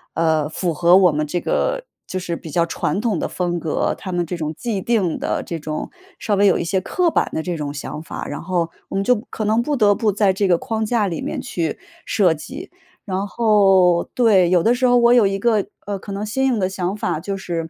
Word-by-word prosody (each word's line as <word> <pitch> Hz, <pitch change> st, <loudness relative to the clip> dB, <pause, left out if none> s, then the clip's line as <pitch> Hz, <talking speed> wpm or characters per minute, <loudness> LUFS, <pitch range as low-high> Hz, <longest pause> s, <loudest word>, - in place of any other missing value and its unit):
呃， 160 Hz, -2 st, +1 dB
符 170 Hz, +1 st, -1 dB
合 175 Hz, +3 st, +5 dB
我 185 Hz, -3 st, +5 dB
们 150 Hz, +1 st, -1 dB
这 175 Hz, +4 st, -1 dB
个 -, -, -1 dB, 0.2 s
就 185 Hz, -, -4 dB
是 175 Hz, -2 st, -3 dB
比 160 Hz, -, -9 dB
较 170 Hz, +3 st, +1 dB
传 165 Hz, +2 st, -2 dB
统 215 Hz, -7 st, 0 dB
的 -, -, -1 dB
风 175 Hz, -1 st, -2 dB
格， 160 Hz, -2 st, -1 dB
他 185 Hz, -, -7 dB
们 175 Hz, -1 st, -1 dB
这 175 Hz, +2 st, -4 dB
种 155 Hz, -2 st, -3 dB
既 220 Hz, -6 st, -3 dB
定 200 Hz, -8 st, 0 dB
的 -, -, -2 dB
这 170 Hz, -, -5 dB
种 155 Hz, 0 st, -5 dB, 0.3 s
稍 210 Hz, -, -2 dB
微 200 Hz, 0 st, +4 dB
有 190 Hz, -, +4 dB
一 -, -, -2 dB
些 185 Hz, +3 st, 0 dB
刻 345 Hz, -, 0 dB
板 -, -, +1 dB
的 160 Hz, -, -2 dB
这 180 Hz, -2 st, -3 dB
种 150 Hz, -2 st, -4 dB
想 150 Hz, +1 st, -6 dB
法。 165 Hz, -, -7 dB
然 145 Hz, -, -5 dB
后 170 Hz, -2 st, -1 dB, 0.2 s
我 -, -, -5 dB
们 195 Hz, -, +1 dB
就 250 Hz, +5 st, +4 dB
可 215 Hz, -, -4 dB
能 220 Hz, +3 st, +2 dB
不 290 Hz, +4 st, -1 dB
得 210 Hz, -5 st, +4 dB
不 215 Hz, 0 st, +1 dB
在 200 Hz, -1 st, +2 dB
这 195 Hz, +1 st, 0 dB
个 175 Hz, -2 st, +4 dB
框 225 Hz, +1 st, -3 dB
架 220 Hz, -1 st, +1 dB
里 170 Hz, -4 st, -4 dB
面 -, -, -4 dB
去 165 Hz, -3 st, -3 dB, 0.3 s
设 185 Hz, -6 st, +3 dB
计， 280 Hz, -, -9 dB, 0.3 s
然 195 Hz, 0 st, -2 dB
后 195 Hz, -6 st, +4 dB
对， 200 Hz, -8 st, +4 dB
有 180 Hz, -2 st, +3 dB
的 235 Hz, -, +4 dB
时 250 Hz, +1 st, +2 dB
候 245 Hz, -, +5 dB
我 240 Hz, 0 st, +5 dB
有 235 Hz, -5 st, +5 dB
一 195 Hz, 0 st, -1 dB
个， 215 Hz, -1 st, +1 dB, 0.2 s
呃， 200 Hz, -1 st, -3 dB
可 200 Hz, -, -9 dB
能 200 Hz, +2 st, -3 dB
新 265 Hz, +6 st, -1 dB
颖 250 Hz, -3 st, +1 dB
的 185 Hz, -, +1 dB
想 190 Hz, 0 st, -3 dB
法 155 Hz, -, -2 dB
就 195 Hz, +4 st, -4 dB
是， 165 Hz, -3 st, -4 dB
190 Hz, 265 characters per minute, -20 LUFS, 170-215 Hz, 0.3 s, 合